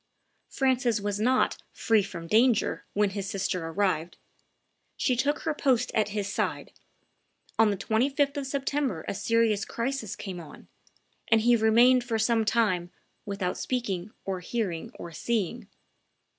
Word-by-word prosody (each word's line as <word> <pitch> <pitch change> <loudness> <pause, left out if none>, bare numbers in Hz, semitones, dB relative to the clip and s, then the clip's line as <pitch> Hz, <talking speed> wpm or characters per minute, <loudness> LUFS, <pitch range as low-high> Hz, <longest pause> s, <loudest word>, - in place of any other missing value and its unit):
Francis 255 -4 +1
was 205 0 -2
not 255 +4 +2
"free 225 -2 +2
from 180 -4 -7
danger" 225 +4 +2
when 205 -1 +2
his 195 0 -4
sister 185 -4 -2
arrived; 175 -2 -1 0.8
she 255 - +1
took 285 +4 0
her 320 - -1
post 255 -4 +1
at 215 -1 +1
his 205 -1 -2
side; 200 - -2 0.9
on 225 -1 +6
the 200 - -1
25th 275 +7 +1
of 280 -2 -3
September 275 - -2
a - - -1
serious 215 0 +1
crisis 235 -3 -3
came 185 -3 -6
on; 160 -3 -12 0.6
and 225 -1 +4
he 240 +2 +5
remained 235 +3 +5
for 235 -2 -1
some 225 0 +2
time 190 -6 +1 0.4
"without 195 -3 -2
speaking, 210 -7 -2 0.2
or 190 -1 -2
hearing, 180 -3 -3
or 170 - -8
seeing." 205 +3 -2
220 Hz, 145 wpm, -27 LUFS, 195-245 Hz, 0.9 s, on